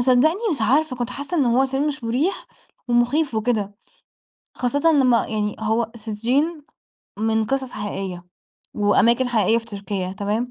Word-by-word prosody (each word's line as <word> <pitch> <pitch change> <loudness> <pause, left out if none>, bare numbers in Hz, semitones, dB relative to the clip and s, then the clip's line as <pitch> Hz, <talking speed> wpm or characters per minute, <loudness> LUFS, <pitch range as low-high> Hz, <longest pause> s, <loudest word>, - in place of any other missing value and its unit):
صدقني 265 - +3
مش - - -1
عارفة، 270 +5 +2
كنت 240 0 -3
حاسة 285 +7 -4
إن 290 - +3
هو 250 +2 +3
فيلم 270 +2 -1
مش 295 -4 -3
مريح 265 +12 -1 0.4
ومخيف 245 +4 +2
وكده. 215 -2 -1 0.8
خاصةً 285 +6 +1
لمّا 255 -5 +3
يعني 210 -1 -2
هو 220 +1 0
سجّين 245 +9 -1 0.6
من 220 0 +1
قصص 265 +1 -1
حقيقية، 195 -4 -5 0.5
وأماكن 235 +4 +3
حقيقية 225 -1 +3
في 230 - -9
تركيا 200 -3 -4
تمام، 210 +5 -2
240 Hz, 145 wpm, -22 LUFS, 215-270 Hz, 0.8 s, صدقني